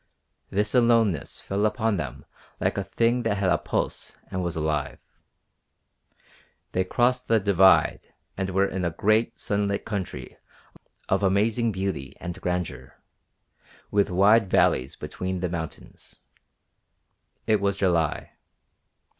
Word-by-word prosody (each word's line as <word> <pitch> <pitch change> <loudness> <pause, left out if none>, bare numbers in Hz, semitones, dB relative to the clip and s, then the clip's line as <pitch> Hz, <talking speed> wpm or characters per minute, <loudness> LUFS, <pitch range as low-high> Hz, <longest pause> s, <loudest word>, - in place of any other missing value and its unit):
This 105 +1 0
aloneness 115 - +2
fell 100 +1 -2
upon 110 0 +1
them 70 -7 -6 0.3
like - - 0
a 100 - -1
thing 115 +5 +1
that 110 -3 0
had 95 -2 +1
a - - +2
pulse - - -3
and 95 - -2
was 85 -1 -2
alive. 75 -2 -2 1.7
They 95 - +1
crossed 125 +6 +1
the 115 -1 +4
Divide 95 -2 +3 0.2
and 95 0 -2
were 95 +1 +2
in 95 -1 -3
a 85 - +1
great 110 +7 +1
sunlit 100 -1 -1
country 100 -5 -5 0.7
of 95 - +1
amazing 105 +4 +2
beauty 95 -9 -4
and 85 0 -7
grandeur, 75 -8 -4 0.9
with 100 0 +2
wide 100 +3 +4
valleys 65 -6 +2
between 95 0 -4
the 90 0 -2
mountains. 80 -2 -8 1.3
It 110 -2 +2
was 100 -1 0
July. 85 -6 0
95 Hz, 125 wpm, -25 LUFS, 90-110 Hz, 1.7 s, the